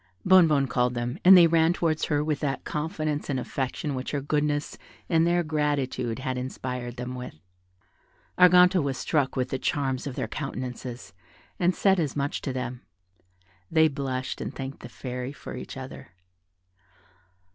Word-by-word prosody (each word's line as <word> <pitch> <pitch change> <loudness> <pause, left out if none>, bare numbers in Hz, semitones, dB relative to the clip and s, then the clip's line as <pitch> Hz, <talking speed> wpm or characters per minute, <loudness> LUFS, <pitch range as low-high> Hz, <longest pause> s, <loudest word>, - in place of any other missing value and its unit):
Bonnebonne 165 -7 +6
called 125 -1 0
them, 120 +6 -3
and 185 +1 +10
they 175 - +8
ran 165 0 +4
towards 160 -3 0
her 145 -1 0
with 155 -1 -1
that 135 -3 -2
confidence 155 -1 -3
and 135 -2 0
affection 135 +3 -3
which 130 0 -4
her 145 - -1
goodness 145 +1 -1 0.3
and 165 -1 +3
their 175 0 +2
gratitude 145 -6 -1
had 130 -1 -3
inspired 125 -1 -5
them 125 +1 -5
with. 125 -8 -7 1.0
Arganto 180 0 +6
was 140 -2 -2
struck 145 -5 0
with 130 -1 -1
the 130 - -2
charms 135 -1 -1
of 135 - -5
their - - -2
countenances, 125 -5 -6 0.5
and 180 +1 +2
said 195 -2 +3
as 150 -6 -1
much 140 0 -2
to 135 - -3
them; 125 -1 -4 0.9
they 160 0 +5
blushed, 135 -3 -3
and - - -5
thanked 135 +1 -6
the 120 - -10
Fairy 125 +1 -5
for 145 - -9
each 125 - -8
other. 130 0 -8
140 Hz, 160 wpm, -26 LUFS, 130-155 Hz, 1.0 s, and